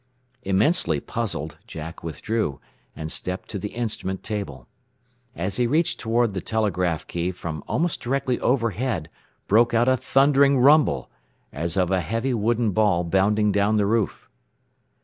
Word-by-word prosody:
Immensely 95 - +2
puzzled, 80 -8 -4
Jack 80 -4 -8
withdrew, 85 - -2 0.4
and 80 0 -5
stepped 90 +1 -5
to 100 - -4
the 105 +3 -6
instrument 105 -5 -3
table. 75 - -5 0.7
As 95 +3 -2
he 125 - +2
reached 155 +6 +1
toward 115 -1 +1
the 95 - -3
telegraph 90 -7 -1
key 85 +1 -2
from 80 -4 -6
almost 170 +1 -1
directly 130 0 -1
overhead 115 - -1 0.4
broke 115 +3 +4
out 120 +2 +3
a 130 - +5
thundering 140 +1 +3
rumble, 135 - +4 0.4
as 85 +4 -2
of 90 -1 +2
a 95 -1 +2
heavy 115 +10 -1
wooden 115 0 +1
ball 100 -4 +2
bounding 100 +4 +2
down 100 +2 +2
the 105 - +2
roof. 110 0 -1
105 Hz, 145 wpm, -24 LUFS, 90-120 Hz, 0.7 s, a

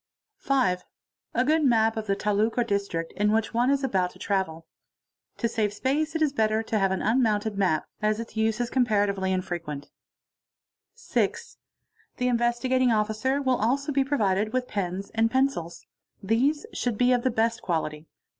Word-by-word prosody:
f - - -30
5. 250 -10 +2 0.5
A 250 +2 +2
good 310 +2 +3
map 225 -4 +3
of 220 -1 -4
the 195 - +1
taluq 210 +3 0
or 240 - +3
district 200 -6 -2
in 210 +1 +2
which 220 +1 0
one 240 +2 +2
is 280 0 +1
about 190 -8 +1
to - - -17
itavel. 190 -5 -2 0.7
To 235 - 0
save 220 -2 0
space 295 +8 -1
it 320 - +2
is 290 -3 +1
better 220 -3 +1
to 220 -1 -1
have 195 -1 +2
an 190 -1 -2
unmounted 220 -2 +1
map, 185 -6 +1 0.2
as 215 +1 +1
its 230 -1 -7
use 220 0 +1
aed 205 -6 +1
infrequent. 170 -6 -4 1.0
6. - - -2 0.6
The 250 - 0
Investigating 240 +1 +2
Officer 220 +6 0
will 260 -2 +2
also 275 +7 0
be 275 -1 +2
provided 215 -6 0
with 255 -1 0
pens 195 -1 -3
and 225 0 +2
ils. 260 -11 0 0.4
These 265 - +1
should 240 -4 -2
be 250 +2 +4
of 245 - +2
the 255 - +1
best 230 0 0
quality. 155 -2 -3
220 Hz, 170 wpm, -26 LUFS, 200-255 Hz, 1.0 s, be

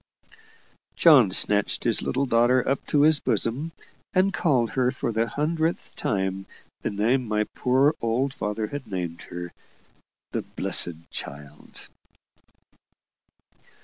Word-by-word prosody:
John 140 - +6
snatched 100 +2 +1
his - - +2
little 135 +2 -1
daughter 125 +1 +3
up 135 0 0
to 145 - +2
his 155 0 +5
bosom, 140 +8 -1 0.4
and 190 +1 +2
called 135 -9 +1
her 125 -1 +1
for 125 -2 -3
the 115 +1 0
hundredth 160 +5 -2
time 95 -1 -2 0.3
the - - -2
name 115 +5 0
my 105 0 +1
poor 135 +4 +3
old 125 +4 0
father 105 -3 -3
had 145 +1 -7
named 90 -4 -4
her 90 0 -7 0.8
the - - -2
"blessed" 85 -1 -2
child. 70 +1 -9
120 Hz, 120 wpm, -25 LUFS, 100-140 Hz, 0.8 s, John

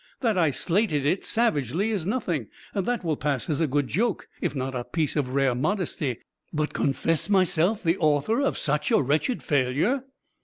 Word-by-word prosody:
That 230 -5 +2
I 170 -4 +3
slated 165 - 0
it 180 +6 +1
savagely, 200 - +1
is 190 -6 -2
nothing. 175 - -1 0.3
That 210 +3 -1
will 160 -3 0
pass 140 -4 -1
as 145 - 0
a 160 - +3
good 145 +1 +1
joke, 215 - -1
if - - -1
not 135 0 -2
a 125 -1 -3
piece 155 +2 -2
of 135 -4 -1
rare 135 -2 +3
modesty. 150 - -1 0.3
But 155 -1 -1
confess 165 +5 0
myself 190 +1 +2
the 170 +1 +1
author 155 - +2
of 275 - 0
such 150 0 0
a - - +4
wretched 150 - 0
failure!" 145 - +1
155 Hz, 180 wpm, -26 LUFS, 140-200 Hz, 0.3 s, a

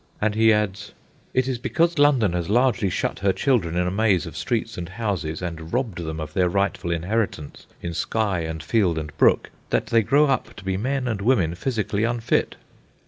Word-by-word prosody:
And 105 0 +1
he 110 +1 +4
adds: 105 -1 -1 0.4
"It 130 0 +1
is 130 -3 -2
because 170 +5 +1
London 130 -10 +4
has 85 0 -2
largely 120 -3 +2
shut - - -2
her 100 0 +2
children 95 - +1
in 90 - +2
a 90 - -1
maze 100 -3 +2
of - - -9
streets - - -2
and 85 -1 -6
houses 95 -6 -3
and 80 -2 -6
robbed 120 -8 -1
them 80 -1 -4
of 75 0 -6
their 90 +1 +2
rightful 100 -1 -1
inheritance 85 -2 -2 0.2
in 85 -1 -3
sky 100 +1 0
and 80 -1 -4
field 90 -1 +1
and 75 -1 -5
brook, - - +3 0.2
that - - +1
they 115 - +3
grow 140 +8 +4
up 135 -4 -1
to 105 - -11
be 95 0 -1
men 130 +5 -1
and 110 -5 -2
women 100 -8 +2
physically 105 0 -1
unfit." 115 0 0
100 Hz, 195 wpm, -23 LUFS, 85-115 Hz, 0.4 s, he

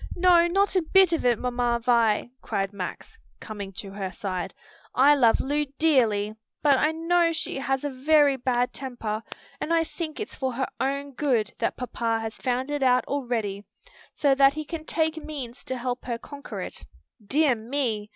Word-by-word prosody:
"No, 345 -1 +5
not 390 +3 +2
a 370 - +4
bit 370 +1 +4
of 315 -6 +1
it, 240 -2 +3
Mamma 245 -1 0
Vi," 230 -3 +3
cried 195 0 -2
Max, 190 -2 -7 0.2
coming 205 -3 -7
to 195 +1 -7
her 195 -1 -4
side. 185 -2 -4 0.4
"I 280 +3 +6
love 240 -6 +4
Lu 295 +2 0
dearly, 225 -10 +2 0.3
but 285 -2 +6
I 305 - +3
know 335 +1 +2
she 320 -4 -3
has 270 0 -1
a 290 - -1
very 285 +1 +4
bad 245 -1 0
temper, 235 -5 -4 0.4
and 330 - -3
I 330 -1 +4
think 320 -1 -6
it's 425 - -5
for 260 -2 -2
her 265 +2 -1
own 280 +1 -1
good 245 -7 0
that - - -1
papa 235 -2 -1
has 225 0 -5
found 255 +2 -1
it 290 -1 -2
out 255 -1 +3
already, 230 -8 -2 0.5
so 280 -2 +3
that 275 +1 +5
he 310 0 -4
can 315 0 -6
take 320 0 0
means 275 -6 -6
to 260 - -3
help 250 0 -4
her 240 -2 -2
conquer 285 +4 -8
it. - - -7 0.4
Dear 280 +6 +3
me! 225 -2 -2
260 Hz, 180 wpm, -26 LUFS, 230-300 Hz, 0.5 s, I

